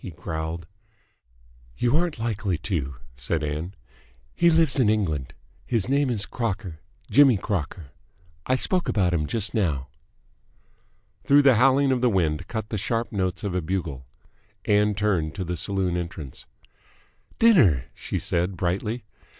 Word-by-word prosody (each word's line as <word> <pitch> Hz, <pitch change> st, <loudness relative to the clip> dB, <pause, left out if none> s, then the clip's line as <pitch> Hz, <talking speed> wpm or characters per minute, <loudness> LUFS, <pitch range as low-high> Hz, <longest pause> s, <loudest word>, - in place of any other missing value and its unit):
he -, -, -5 dB
growled. 80 Hz, 0 st, -5 dB, 1.1 s
"You 120 Hz, +3 st, +1 dB
aren't 170 Hz, -2 st, +1 dB
likely 110 Hz, -5 st, -1 dB
to," 75 Hz, -7 st, -3 dB, 0.2 s
said 70 Hz, +6 st, -2 dB
Ann. 75 Hz, +6 st, -4 dB, 0.6 s
"He 170 Hz, -, +4 dB
lives 160 Hz, -4 st, +3 dB
in 115 Hz, -5 st, +4 dB
England. 80 Hz, -, -1 dB, 0.3 s
His 115 Hz, -4 st, 0 dB
name 140 Hz, +1 st, +2 dB
is 105 Hz, -4 st, -1 dB
Crocker. 100 Hz, -9 st, -4 dB, 0.3 s
Jimmy 135 Hz, -5 st, +6 dB
Crocker. 85 Hz, -6 st, -4 dB, 0.6 s
I 130 Hz, -, +3 dB
spoke 180 Hz, +6 st, +1 dB
about 90 Hz, -4 st, +1 dB
him 75 Hz, -3 st, 0 dB
just 110 Hz, +1 st, 0 dB
now." 75 Hz, -, -1 dB, 1.3 s
Through 145 Hz, +1 st, +5 dB
the 135 Hz, -2 st, +7 dB
howling 135 Hz, +2 st, +4 dB
of 125 Hz, -2 st, +1 dB
the 125 Hz, -, +4 dB
wind 80 Hz, -7 st, 0 dB
cut 110 Hz, -2 st, -4 dB
the 110 Hz, -, -2 dB
sharp 115 Hz, +4 st, -1 dB
notes 95 Hz, -2 st, -2 dB
of 100 Hz, -3 st, -2 dB
a 90 Hz, -, 0 dB
bugle. 80 Hz, -7 st, -4 dB, 0.6 s
Ann 105 Hz, 0 st, +3 dB
turned 95 Hz, -7 st, 0 dB
to 95 Hz, -, -3 dB
the 90 Hz, 0 st, -3 dB
saloon 95 Hz, 0 st, -1 dB
entrance. 85 Hz, -5 st, -6 dB, 0.9 s
"Dinner!" 120 Hz, -, +5 dB
she -, -, -4 dB
said 90 Hz, +2 st, -1 dB
brightly. 100 Hz, +7 st, -2 dB
95 Hz, 145 wpm, -25 LUFS, 85-120 Hz, 1.3 s, the